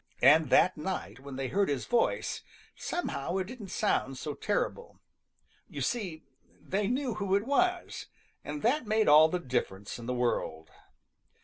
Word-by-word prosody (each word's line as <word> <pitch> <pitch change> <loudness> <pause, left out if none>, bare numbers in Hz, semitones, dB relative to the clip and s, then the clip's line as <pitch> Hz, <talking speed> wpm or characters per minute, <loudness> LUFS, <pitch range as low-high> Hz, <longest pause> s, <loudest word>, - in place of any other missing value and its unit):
And 155 -2 +6
that 185 +5 +4
night 150 - -4
when 140 0 -9
they 135 -1 -3
heard 200 -2 +1
his 140 -3 -1
voice, 240 - 0 0.3
somehow 185 - -3
it 190 - -1
didn't 220 -1 -9
sound 135 -6 0
so 150 +1 -4
terrible. 345 - -2 0.7
You - - -6
see, 185 -10 -2 0.4
they 195 +1 -1
knew 255 +1 -1
who 200 -2 0
it 200 +2 +1
was, 360 +6 0 0.4
and 295 - -6
that 250 +2 +2
made 215 0 +2
all 155 +2 +8
the 180 - 0
difference 120 - -3
in 115 - -8
the 125 - -1
world. 120 -10 -1
185 Hz, 155 wpm, -30 LUFS, 135-230 Hz, 0.7 s, all